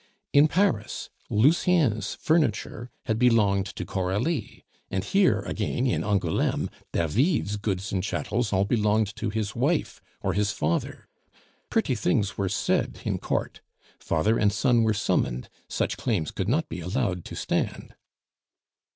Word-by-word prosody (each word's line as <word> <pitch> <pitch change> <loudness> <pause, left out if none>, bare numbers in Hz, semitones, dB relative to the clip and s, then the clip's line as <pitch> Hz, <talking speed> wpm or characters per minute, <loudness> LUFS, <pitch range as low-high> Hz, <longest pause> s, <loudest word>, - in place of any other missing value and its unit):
In 145 +2 +7
Paris 190 +6 0 0.2
Lucien's 130 - +3
furniture 125 -6 0 0.2
had 110 -2 0
belonged 105 -5 +3
to - - -6
Coralie, 105 - -2 0.2
and 95 0 -1
here 185 - +3
again 110 +5 -2
in 125 - +1
Angouleme 100 -6 0 0.2
David's 105 - +1
goods 100 -2 -2
and 95 - 0
chattels 115 +3 -1
all 95 0 +2
belonged 105 -1 +1
to 115 - -2
his 110 0 -3
wife 145 +7 0 0.2
or 95 - +1
his 100 +1 +1
father; 80 -1 -2 0.6
pretty - - +1
things 100 +1 0
were 95 -1 -1
said 95 - 0
in - - -1
court. - - -2 0.4
Father 105 +8 +1
and 105 -2 +3
son 120 +2 +3
were 110 -1 +2
summoned; 65 -10 0 0.2
such - - -1
claims 105 - -1
could 95 +1 -2
not 155 +6 +1
be - - -6
allowed 90 0 -1
to - - -7
stand. - - -2
105 Hz, 140 wpm, -26 LUFS, 95-125 Hz, 0.6 s, In